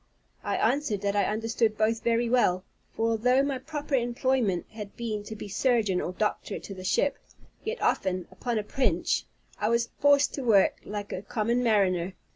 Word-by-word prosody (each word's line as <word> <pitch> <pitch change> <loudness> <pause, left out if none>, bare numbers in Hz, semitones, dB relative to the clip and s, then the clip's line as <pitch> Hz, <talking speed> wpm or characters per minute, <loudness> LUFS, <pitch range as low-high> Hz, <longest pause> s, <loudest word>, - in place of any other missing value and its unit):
I - - -1
answered 265 -9 +1
that 200 0 0
I 200 -2 +3
understood 225 0 0
both 220 +1 +1
very 235 0 +1
well: 205 -7 +2 0.3
for 225 0 +1
although 250 +4 +3
my 275 -2 -1
proper 295 +1 -6
employment 240 -5 +1
had 210 -2 -8
been 220 -3 -3
to 220 - -7
be 210 - -7
surgeon 210 -3 +1
or - - -3
doctor 210 +3 -2
to 200 - -8
the 185 -1 -9
ship, 280 +9 +1 0.4
yet 455 +3 -3
often, 185 -1 0
upon 240 -2 -3
a 215 - -1
pinch, 255 +5 0 0.3
I 210 - +1
was 235 0 +1
forced 285 0 +4
to 275 - -4
work 215 -5 +4
like 205 -1 -5
a 185 - -4
common 230 +4 0
mariner. 190 -5 +2
225 Hz, 180 wpm, -28 LUFS, 205-250 Hz, 0.4 s, forced